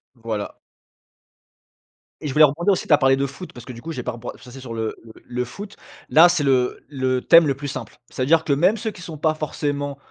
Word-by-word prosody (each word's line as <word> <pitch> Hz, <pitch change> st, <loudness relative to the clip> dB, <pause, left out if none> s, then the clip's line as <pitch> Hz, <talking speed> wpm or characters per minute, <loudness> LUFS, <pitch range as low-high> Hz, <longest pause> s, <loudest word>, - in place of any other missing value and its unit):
Voilà. 110 Hz, -3 st, -5 dB, 1.7 s
Et 150 Hz, -, -4 dB
je 130 Hz, -, -3 dB
voulais 155 Hz, 0 st, +8 dB
rebondir 170 Hz, +8 st, +1 dB
aussi, -, -, -3 dB
tu 155 Hz, -, +4 dB
as -, -, +7 dB
parlé 135 Hz, -1 st, +4 dB
de 140 Hz, +1 st, 0 dB
foot 140 Hz, +7 st, -9 dB
parce 120 Hz, -1 st, -11 dB
que 130 Hz, -, -8 dB
du 115 Hz, -, -11 dB
coup, 165 Hz, -, -6 dB
j'ai -, -, -5 dB
pas 125 Hz, -, -2 dB
reb 115 Hz, -1 st, -11 dB
heu, -, -, -3 dB
je -, -, -19 dB
suis 125 Hz, -, -15 dB
passé 135 Hz, +2 st, -11 dB
sur 125 Hz, -3 st, -8 dB
le 110 Hz, -1 st, -3 dB
le 115 Hz, -, -13 dB
le 125 Hz, 0 st, -3 dB
foot. 200 Hz, +10 st, -9 dB, 0.3 s
Là, 165 Hz, +3 st, +7 dB
c'est 170 Hz, -4 st, +1 dB
le 130 Hz, -2 st, +1 dB
le 130 Hz, -3 st, -1 dB
thème 165 Hz, -2 st, +6 dB
le 135 Hz, -, 0 dB
plus 145 Hz, +1 st, -6 dB
simple. 140 Hz, -, -7 dB
C'est-à-dire 155 Hz, +5 st, +2 dB
que, 140 Hz, -, +1 dB
même 180 Hz, +10 st, +3 dB
ceux 220 Hz, 0 st, -3 dB
qui 180 Hz, -, -13 dB
sont 160 Hz, -2 st, -8 dB
pas 155 Hz, +1 st, +1 dB
forcément 145 Hz, -2 st, -3 dB
140 Hz, 255 wpm, -22 LUFS, 125-160 Hz, 1.7 s, voulais